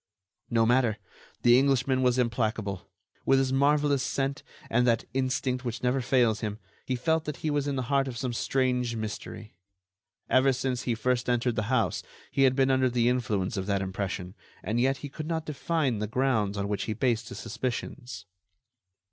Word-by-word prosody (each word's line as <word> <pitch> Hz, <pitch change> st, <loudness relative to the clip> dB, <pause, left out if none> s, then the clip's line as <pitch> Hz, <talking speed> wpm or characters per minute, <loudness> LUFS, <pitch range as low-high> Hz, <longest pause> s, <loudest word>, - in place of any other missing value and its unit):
No 115 Hz, -1 st, +3 dB
matter! 120 Hz, -2 st, +3 dB, 0.5 s
The 120 Hz, +1 st, +7 dB
Englishman 135 Hz, -1 st, +2 dB
was 125 Hz, -1 st, +3 dB
implacable. 110 Hz, -5 st, -1 dB, 0.3 s
With 135 Hz, -, +4 dB
his 135 Hz, -1 st, +1 dB
marvellous 145 Hz, 0 st, +3 dB
scent, 135 Hz, +1 st, -1 dB, 0.3 s
and 120 Hz, +2 st, +2 dB
that 115 Hz, -2 st, +2 dB
instinct 130 Hz, -1 st, -1 dB
which 120 Hz, -1 st, -4 dB
never 125 Hz, +2 st, +2 dB
fails 120 Hz, -4 st, +2 dB
him, 105 Hz, -2 st, -3 dB, 0.3 s
he 130 Hz, -, 0 dB
felt 160 Hz, +6 st, 0 dB
that 150 Hz, -, -4 dB
he 155 Hz, -, +1 dB
was 145 Hz, -1 st, 0 dB
in 140 Hz, -, -1 dB
the 130 Hz, -, -1 dB
heart 135 Hz, +2 st, +1 dB
of 125 Hz, -2 st, -5 dB
some 125 Hz, 0 st, -2 dB
strange 125 Hz, -1 st, 0 dB
mystery. 110 Hz, 0 st, -6 dB, 0.7 s
Ever 130 Hz, +1 st, +4 dB
since 130 Hz, -1 st, -2 dB
he 120 Hz, -2 st, -1 dB
first 125 Hz, +2 st, 0 dB
entered 120 Hz, -1 st, +1 dB
the 110 Hz, +1 st, -2 dB
house, 130 Hz, -4 st, +1 dB, 0.3 s
he 135 Hz, -, +3 dB
had 130 Hz, -1 st, +3 dB
been 135 Hz, 0 st, +3 dB
under 130 Hz, -1 st, +3 dB
the 120 Hz, -1 st, +2 dB
influence 110 Hz, -4 st, -1 dB
of 95 Hz, 0 st, -3 dB
that 100 Hz, -1 st, +1 dB
impression, 95 Hz, -1 st, -4 dB, 0.3 s
and 115 Hz, +2 st, -1 dB
yet 135 Hz, +2 st, +2 dB
he 145 Hz, -, -7 dB
could 155 Hz, +3 st, -6 dB
not 160 Hz, -1 st, -2 dB
define 150 Hz, -5 st, -1 dB
the 105 Hz, -, -2 dB
grounds 110 Hz, -4 st, 0 dB
on 100 Hz, 0 st, -1 dB
which 105 Hz, -1 st, -2 dB
he 110 Hz, -, -2 dB
based 115 Hz, 0 st, 0 dB
his 125 Hz, -, -8 dB
suspicions. 120 Hz, -4 st, -5 dB
125 Hz, 185 wpm, -28 LUFS, 110-135 Hz, 0.7 s, The